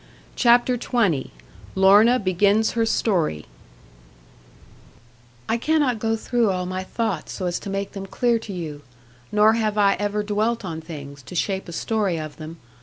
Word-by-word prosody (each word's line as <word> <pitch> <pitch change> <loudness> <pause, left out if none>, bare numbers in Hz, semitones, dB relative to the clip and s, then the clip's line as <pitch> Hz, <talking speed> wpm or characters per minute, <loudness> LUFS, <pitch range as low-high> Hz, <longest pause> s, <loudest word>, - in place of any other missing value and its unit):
CHAPTER 245 0 +4
XX 205 - 0 0.5
LORNA 205 +6 +6
BEGINS 200 +2 +2
HER 230 -1 0
STORY 180 - 0 2.0
'I 230 - +1
cannot 280 -3 +1
go 225 +1 0
through 230 0 0
all 180 -1 -1
my 185 +1 -4
thoughts 225 +4 -3
so 185 - -4
as 175 -1 -1
to - - -7
make 195 0 -3
them 195 -1 -7
clear 235 +2 +1
to 220 - -8
you, 160 -6 -6 0.5
nor 210 +1 +5
have 215 -2 -1
I 200 -1 +4
ever 205 0 -1
dwelt 215 +2 -1
on 160 -3 -5
things, 140 -3 -9
to 180 - -11
shape 190 +1 -2
a - - -6
story 200 0 -1
of 155 -1 -7
them. 160 +1 -9
205 Hz, 160 wpm, -23 LUFS, 180-225 Hz, 2.0 s, LORNA